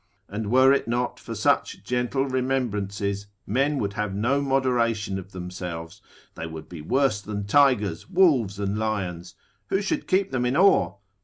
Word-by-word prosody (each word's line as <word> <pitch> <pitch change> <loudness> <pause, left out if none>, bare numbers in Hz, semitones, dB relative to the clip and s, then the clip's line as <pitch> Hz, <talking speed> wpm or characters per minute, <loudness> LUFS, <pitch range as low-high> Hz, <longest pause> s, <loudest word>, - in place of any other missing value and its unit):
And 105 +1 -4
were 130 +3 +6
it 140 - 0
not 120 +1 -1
for - - -7
such - - +1
gentle 125 +2 0
remembrances, 105 -7 -1 0.2
men 140 +7 +1
would 100 -5 -2
have 105 -3 -2
no 125 +7 +1
moderation 120 -7 +1
of 95 +1 -11
themselves, 90 0 -7 0.3
they 85 - -6
would 80 -1 -8
be 85 -4 -9
worse 125 - +1
than 100 -1 -4
tigers, 105 - +2
wolves, 145 - +3
and 100 +1 -2
lions: 95 -6 -3 0.3
who 195 - +1
should 255 +10 -2
keep 195 +1 +2
them 130 -2 0
in 130 +4 0
awe? 190 - +4
110 Hz, 160 wpm, -25 LUFS, 100-135 Hz, 0.3 s, were